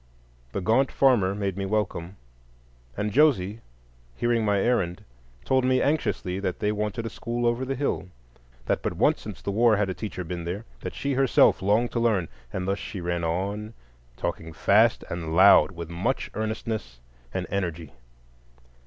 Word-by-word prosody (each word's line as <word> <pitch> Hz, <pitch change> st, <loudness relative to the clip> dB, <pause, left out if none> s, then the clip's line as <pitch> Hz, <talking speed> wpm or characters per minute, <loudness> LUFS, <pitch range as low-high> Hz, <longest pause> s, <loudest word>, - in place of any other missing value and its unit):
The 100 Hz, -, -3 dB
gaunt 115 Hz, +8 st, +2 dB
farmer 110 Hz, -8 st, +3 dB
made 100 Hz, -2 st, -2 dB
me 100 Hz, 0 st, -2 dB
welcome, 100 Hz, -3 st, -2 dB, 0.8 s
and 105 Hz, 0 st, -1 dB
Josie, 115 Hz, -8 st, +3 dB, 0.6 s
hearing 120 Hz, -, +1 dB
my 105 Hz, -1 st, +2 dB
errand, 95 Hz, -6 st, 0 dB, 0.4 s
told 130 Hz, -1 st, +2 dB
me 130 Hz, 0 st, +3 dB
anxiously 105 Hz, -, 0 dB
that 95 Hz, -2 st, -2 dB
they 105 Hz, 0 st, 0 dB
wanted 105 Hz, +1 st, -2 dB
a -, -, -2 dB
school 120 Hz, +1 st, -3 dB
over 120 Hz, +2 st, +1 dB
the 135 Hz, +1 st, -2 dB
hill; 135 Hz, -9 st, -2 dB, 0.6 s
that -, -, 0 dB
but -, -, -2 dB
once -, -, +2 dB
since -, -, -9 dB
the 100 Hz, -, -2 dB
war 110 Hz, +1 st, +4 dB
had 100 Hz, -2 st, 0 dB
a -, -, -2 dB
teacher 100 Hz, -2 st, -5 dB
been 85 Hz, 0 st, -5 dB
there; 95 Hz, +6 st, -4 dB
that -, -, -6 dB
she 140 Hz, 0 st, -1 dB
herself 135 Hz, -7 st, +4 dB
longed 105 Hz, +5 st, +2 dB
to 120 Hz, -, -1 dB
learn,—and 90 Hz, -, -2 dB
thus 100 Hz, +1 st, 0 dB
she 100 Hz, -, -6 dB
ran 85 Hz, -1 st, -2 dB
on, 100 Hz, +6 st, -2 dB, 0.4 s
talking 80 Hz, 0 st, -4 dB
fast 110 Hz, +7 st, +3 dB
and 80 Hz, -2 st, -3 dB
loud, 95 Hz, +3 st, +7 dB
with 85 Hz, -3 st, -8 dB
much 95 Hz, +10 st, -2 dB
earnestness 110 Hz, -, -4 dB, 0.3 s
and -, -, -3 dB
energy. 85 Hz, -6 st, -3 dB
105 Hz, 165 wpm, -26 LUFS, 90-115 Hz, 0.8 s, loud